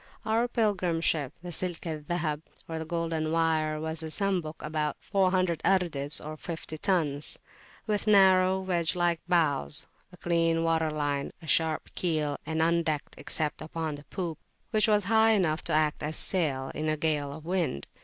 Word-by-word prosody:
Our 225 +2 +2
Pilgrim 200 -8 0
Ship, 150 -5 +1
the 175 - -6
Silk 175 +1 -2
al 160 -2 -3
Zahab, 155 -1 -2 0.3
or 160 -1 -4
the 160 - -4
"Golden 165 -1 -1
Wire," 160 -2 +1
was 160 +1 -3
a 160 - -5
Sambuk, 175 -3 -1
of - - -5
about 150 -1 -1
400 185 -4 +1
ardebs 155 -7 +1 0.2
(fifty 160 -2 -6
tons), 155 -7 +1 0.5
with 210 -1 -1
narrow, 190 -2 +5
wedge 175 -2 +1
like 175 -2 +1
bows, 155 -3 +2 0.3
a 180 - -14
clean 165 -1 +1
water 165 -1 +2
line, 145 -2 -2
a 165 - -13
sharp 160 0 +1
keel, 155 -5 0
and 160 0 +1
undecked, 165 -3 0
except 150 +1 -2
upon 160 0 -3
the 145 0 -10
poop, 170 -4 -4 0.3
which 215 +1 +4
was 210 -1 +4
high 220 +2 +4
enough 170 -6 +1
to - - 0
act 155 -1 +2
as 155 +1 -2
a - - +3
sail 140 -8 0
in 155 0 -2
a 155 - 0
gale 150 -2 0
of 155 +2 -9
wind. 170 - -1
165 Hz, 175 wpm, -28 LUFS, 155-180 Hz, 0.5 s, narrow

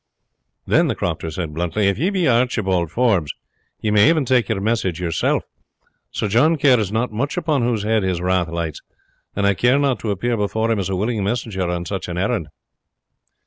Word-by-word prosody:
"Then," - - +3
the - - -1
crofter 80 - -3
said 80 -1 -5
bluntly, 90 +5 0
"if 100 0 0
you 180 +5 +1
be 185 -4 +1
Archibald 110 -8 +1
Forbes, 100 - +1 0.5
you 110 - 0
may 105 +6 +5
even 160 -4 +2
take 125 -2 +2
your 110 -3 0
message 100 -5 -1
yourself. 85 -3 0 0.7
Sir - - -2
John 125 +11 +3
cares 125 -8 +3
not 115 +2 -1
much 135 +10 -2
upon 155 -6 0
whose 115 -3 0
head 110 0 +1
his 95 -2 -1
wrath 90 -1 +1
lights, 85 -2 -4 0.5
and 100 - 0
I 100 - +4
care 125 +7 +3
not 140 -3 +1
to 110 - -4
appear 115 +4 -1
before 110 +2 0
him 110 - +1
as 95 -1 -2
a 95 - -1
willing 105 +2 -1
messenger 100 -4 -2
on 90 0 -3
such 95 +1 -4
an 90 -1 -5
errand." 95 -3 -1
105 Hz, 195 wpm, -20 LUFS, 90-120 Hz, 0.7 s, may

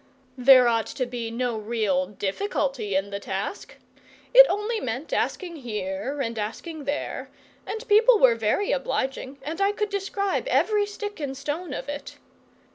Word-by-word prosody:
There 255 -1 +8
ought 230 -2 +1
to 255 - -2
be 240 -2 -4
no 235 -1 -2
real 210 -4 0
difficulty 210 - -2
in 195 +1 0
the 200 - -3
task. 200 - -5 0.6
It - - +10
only 425 +3 -1
meant 255 - -4
asking 350 -3 -1
here 210 +1 -4
and 230 -3 -3
asking 290 +9 -5
there, 285 +2 -3 0.4
and 445 +2 -5
people 445 +3 +6
were 255 - +6
very 230 - 0
obliging, 275 - -2
and 320 +6 -4
I 395 +1 +4
could 420 0 -2
describe 400 +2 -1
every 420 -4 +2
stick 415 -2 -6
and 275 -3 -4
stone 295 +4 -4
of - - -5
it. 290 0 -6
275 Hz, 155 wpm, -25 LUFS, -, 0.6 s, It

